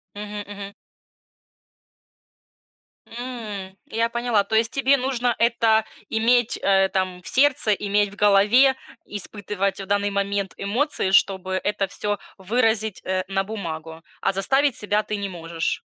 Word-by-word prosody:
Мгм, 210 0 -6
мгм. 200 -1 -8 2.3
М. 220 -6 -7
Я 230 +1 0
поняла. 235 -3 +1
То 220 +2 -2
есть 225 0 +2
тебе 275 +1 +3
нужно 250 -2 0
это 225 -2 +3 0.2
иметь, 230 +1 +2
э, 195 -1 +3
там 185 -2 -2
в - - -12
сердце, 270 -4 +3
иметь 205 0 +1
в 205 - -12
голове, 210 +7 +5 0.3
испытывать 200 -1 -3
в 195 - -5
данный 205 +1 +1
момент 200 0 -1
эмоции, 220 -1 -1
чтобы 190 -1 +2
это 205 -1 0
всё 205 -1 -3 0.2
выразить, 220 0 0
э, 185 0 0
на 195 0 0
бумагу, 165 -6 -6 0.2
а 195 - +1
заставить 270 +7 +2
себя 210 0 0
ты 210 - -3
не 200 -1 -3
можешь. 165 -2 -3
205 Hz, 135 wpm, -23 LUFS, 195-230 Hz, 2.3 s, голове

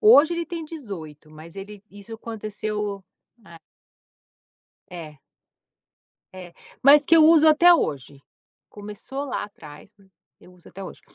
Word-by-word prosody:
Hoje 345 -7 +6
ele 340 0 -4
tem 335 0 -6
18 190 - -10
mas 155 +3 -14
ele 200 +1 -10
isso 205 +3 -11
aconteceu 210 -2 -5 0.4
é. 170 - -14 1.3
É. 160 -5 -10 1.2
É, 180 -2 -11 0.3
mas 285 +2 +7
que 330 - +4
eu 315 - +7
uso 320 -1 +6
até 330 +3 +6
hoje, 140 - -2 0.5
começou 210 +7 -8
lá 275 - -4
atrás, 150 -8 -14
mas 195 -1 -24 0.3
eu 180 - -18
uso 180 -1 -19
até 195 - -11
hoje. - - -11
210 Hz, 135 wpm, -23 LUFS, 175-295 Hz, 1.3 s, mas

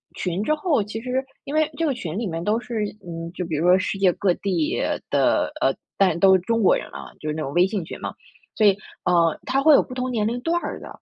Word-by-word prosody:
群 180 +2 -2
之 305 - +1
后， 300 - +1
其 215 +2 -6
实 255 +2 -2 0.2
因 285 - -4
为 310 0 +3
这 - - +1
个 285 -4 0
群 170 -9 -5
里 225 -1 -2
面 165 -1 -4
都 215 +4 +1
是 235 -3 -3 0.2
嗯， 165 -1 -6
就 180 - -4
比 165 -2 -3
如 155 +3 0
说 180 - +7
世 195 - -2
界 190 -2 +3
各 185 -1 +1
地 300 - -1 0.3
的 - - +2
呃， - - +3 0.2
但 185 -4 +3
都 190 +1 +6
是 - - +3
中 230 +4 0
国 195 - +5
人 - - -6
啊， - - -8
就 155 - -7
是 150 - -1
那 160 - -3
种 135 - -3
微 175 +3 +5
信 195 -1 -2
群 - - -8
嘛。 - - -5 0.4
所 215 - +4
以， 195 -1 +4 0.3
呃， 170 -2 +3
它 270 +2 +1
会 310 0 +7
有 - - +7
不 255 - -9
同 255 0 -2
年 215 -3 0
龄 240 +2 -2
段 340 +5 0
儿 - - -5
的， - - -10
205 Hz, 290 characters per minute, -23 LUFS, 175-255 Hz, 0.4 s, 说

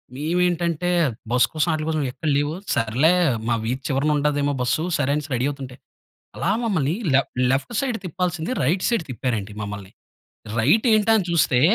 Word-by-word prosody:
మేవేంటంటే 170 +2 0 0.4
bus 125 0 +4
కోసం 155 +1 +1
ఆటిల 155 0 -2
కోసం 155 -2 0
ఎక్కడ 135 +5 -6
లేవు. 145 +1 0 0.2
సర్లే 120 +9 +2 0.4
మా 115 - +2
వీధి 125 +4 -2
చివరన 140 +2 +1
ఉండదేమో 145 0 +1
బస్సు 125 +5 0
సరే 140 -1 0
అనేసి 150 0 -4
రెడీ 125 +1 0
అవుతుంటే, 135 -3 -7 0.6
అలా 190 - 0
మమ్మల్ని 170 - 0 0.2
లె 135 - +6 0.3
లెఫ్ట్ 140 - -1
సైడ్ 255 -4 -1
తిప్పాల్సింది 175 +1 -2
రైట్ 175 +8 +1
సైడ్ 235 -7 +1
తిప్పారండి 110 -4 -3
మమ్మల్ని. 100 -2 -6 0.7
రైటేంటా 220 - +4
అని 190 - -1
చూస్తే, 135 -7 +3
150 Hz, 155 wpm, -22 LUFS, 130-175 Hz, 0.7 s, లె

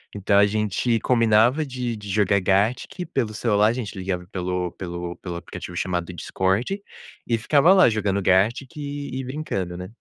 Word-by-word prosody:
Então 100 0 +2
a 100 - +7
gente 110 +2 0
combinava 115 +4 +3
de 125 -4 -4
de 105 -1 -9
jogar 100 -1 +2
Gartic 105 - 0
pelo 115 -5 0
celular, 105 -1 +2
a 115 - +2
gente 120 -5 -5
ligava 95 -1 -3
pelo 90 -1 -2
pelo 85 -1 -6
pelo 90 -2 -6
aplicativo 85 0 -8
chamado 90 -1 -2
Discord, 95 - -1 0.5
e 115 - +2
ficava 145 +9 +4
lá, 185 - +7
jogando 100 -2 0
Gartic 110 - +2
e 145 -2 -5
brincando, 110 - -4
né? 90 +2 -8
105 Hz, 160 wpm, -23 LUFS, 95-125 Hz, 0.5 s, a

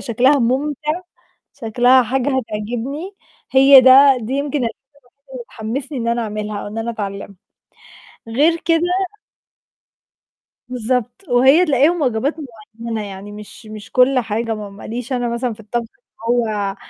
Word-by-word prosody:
شكلها 255 +4 +2
مُمتِع، 295 +6 -1 0.5
شكلها 245 +1 +3
حاجة 260 +3 -1
هتعجبني 245 - -5 0.4
هي 270 0 +8
ده 265 +1 +7
دي 225 +3 -5
يمكن 285 +1 -1
الحاجة 235 -4 -2 0.4
الوحيدة 280 -1 -22
اللي 245 -2 -7
تحمّسني 260 +6 -5
إن 235 -1 -2
أنا 235 0 0
أعملها 210 -1 -4
أو - - -7
إن 215 +2 -6
أنا 225 +1 -3
أتعلّمها. 200 -2 -6 0.9
غير 300 +9 +2
كده 330 -1 +2 1.9
بالضبط 250 - -3
وهي 265 +8 +5
تلاقيهم 300 +4 +2
واجبات 255 +3 0 0.4
معيّنة، 230 -1 -4
يعني 200 +1 -9
مش 210 +2 -12
مش 215 -3 -11
كل 255 +1 +4
حاجة 225 -1 -2
م 210 -2 -8
ما - - -12
ليش 240 +3 -5
أنا 245 -1 -1
مثلًا 235 +1 -2
في 215 - -16
الطبخ 230 +2 -4
اللي 240 0 -2
هو 200 -2 -3
245 Hz, 145 wpm, -18 LUFS, 220-270 Hz, 1.9 s, هي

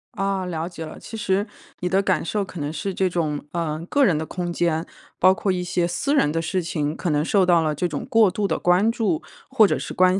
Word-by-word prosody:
啊， 195 -1 -1
了 165 -2 -3
解 165 -3 -7
了。 155 - -9
其 225 - -9
实 195 0 0 0.4
你 180 - -1
的 190 +2 +3
感 185 -4 +1
受 205 +4 -1
可 185 -3 -8
能 145 0 -2
是 190 +5 -3
这 190 0 +1
种 155 -5 -2
呃， 165 -2 -2
个 285 -1 +3
人 165 -7 +3
的 160 - -3
空 175 +1 -4
间， 170 -1 0 0.3
包 185 +1 +6
括 195 +1 -1
一 180 -1 -1
些 175 -1 0
私 275 +12 0
人 150 - +3
的 165 +1 -1
事 180 +3 -1
情， 155 -2 -2
可 175 - -3
能 150 -1 +2
受 190 +2 +3
到 175 -2 +4
了 155 -1 0
这 175 +4 0
种 150 -4 -5
过 225 -3 +5
度 200 +1 -1
的 - - 0
关 185 +6 +3
注 205 -9 0 0.3
或 215 -2 +5
者 - - 0
是 - - -6
关 185 +1 +4
180 Hz, 270 characters per minute, -23 LUFS, 160-195 Hz, 0.4 s, 包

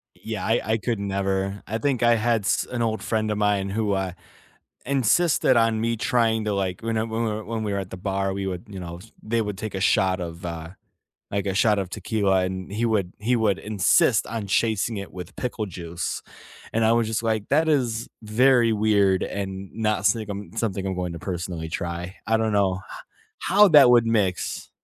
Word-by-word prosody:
Yeah. 110 -4 -5
I 115 +2 +2
I - - +3
could 115 -1 -2
never. 95 0 -1
I 110 - -2
think 135 -2 0
I 120 0 +5
had 115 -2 +1
s - - +1
an 120 -1 -2
old 110 -1 -1
friend 110 -1 0
of 105 - -1
mine 105 -2 +1
who, 105 0 0
uh, 95 -2 -1 0.7
insisted 140 +2 +3
on 115 -1 +3
me 115 0 0
trying 110 -1 +1
to, 105 - 0
like, 95 -1 -2
whene 115 0 -2
whe 110 -1 -1
when 110 0 -3
we 105 -1 -2
were 100 - -1
at 95 -2 -6
the 95 - -6
bar, 95 +1 -1
we 95 0 -3
would, 95 +3 -5
you 95 -2 -7
know 85 -1 -7 0.2
they 115 +1 0
would 105 -2 -4
take 110 +1 -5
a 95 - -3
shot 95 -1 +3
of 85 0 -6
uh, 80 -1 -5 0.6
like, 100 0 -2
a 95 - -1
shot 105 +1 +3
of 95 -2 -3
tequila, 95 -3 +1
and 95 +1 -5
he 115 +3 0
would 100 -5 0
he 120 +3 +1
would 105 -4 +1
insist 105 +2 +3
on 110 -2 -4
chasing 110 +2 +1
it 100 -1 -6
with 90 0 -9
pickle 120 -4 -3
juice, 85 -2 -5 0.5
and 115 0 +1
I 110 - +4
was 115 -1 +2
just 110 0 -1
like, 110 -2 -1
"That 155 +3 +3
is 120 -7 0
very 120 +2 +4
weird 100 -3 +3
and 95 -1 -5
not 105 -3 0
sigm 100 -1 -1
something 100 -4 -2
I 95 - -1
want 90 -2 -3
to 85 - -6
personally 85 -2 -4
try." 85 +3 -4
I 110 - +3
don't 110 -1 0
know 100 -3 +2
h - - -9 0.7
how 205 +2 +7
that 145 -5 +8
would 120 -1 +5
mix. 105 -5 0
105 Hz, 205 wpm, -24 LUFS, 95-115 Hz, 0.7 s, that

